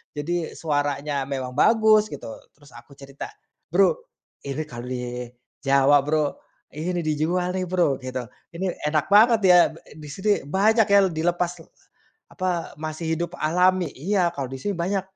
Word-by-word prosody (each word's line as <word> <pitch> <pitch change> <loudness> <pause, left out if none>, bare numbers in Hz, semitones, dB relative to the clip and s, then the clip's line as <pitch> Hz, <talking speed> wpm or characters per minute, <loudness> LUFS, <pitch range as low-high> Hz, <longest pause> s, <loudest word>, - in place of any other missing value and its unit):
Jadi, 165 +3 -3
suaranya 145 -2 -2
memang 130 -2 -4
bagus, 220 0 +5
gitu. 135 - -8 0.2
Terus 145 -1 -20
aku 120 +4 -15
cerita, 140 0 -9 0.4
"Bro, - - +3 0.5
ini 140 +3 -3
kalau 120 -5 -9
di, 125 -1 -5 0.3
Jawa, 140 +1 +4
Bro, 150 -1 0 0.3
ini 175 +3 -3
dijual 160 +4 0
nih, 185 0 -3
Bro," 175 -7 +1
gitu. 130 -1 -5 0.3
"Ini, 180 +1 -3
enak 155 +3 0
banget, 225 +3 +6
ya. 180 -2 +7 0.2
Ba - - -13
di 150 0 -11
sini 190 +8 -1 0.2
banyak 215 +6 +3
ya, 200 -1 +6
l 190 - +1
dilepas 175 +2 0
l 165 - -15 0.6
apa, 180 -2 -3
masih 155 +1 -3
hidup 175 +1 -3
alami." 180 +3 +2
"Iya, 180 +4 +1
kalau 140 - -3
di 135 - -6
sini 205 - -2
banyak, 190 +3 0
160 Hz, 160 wpm, -24 LUFS, 140-185 Hz, 0.6 s, ya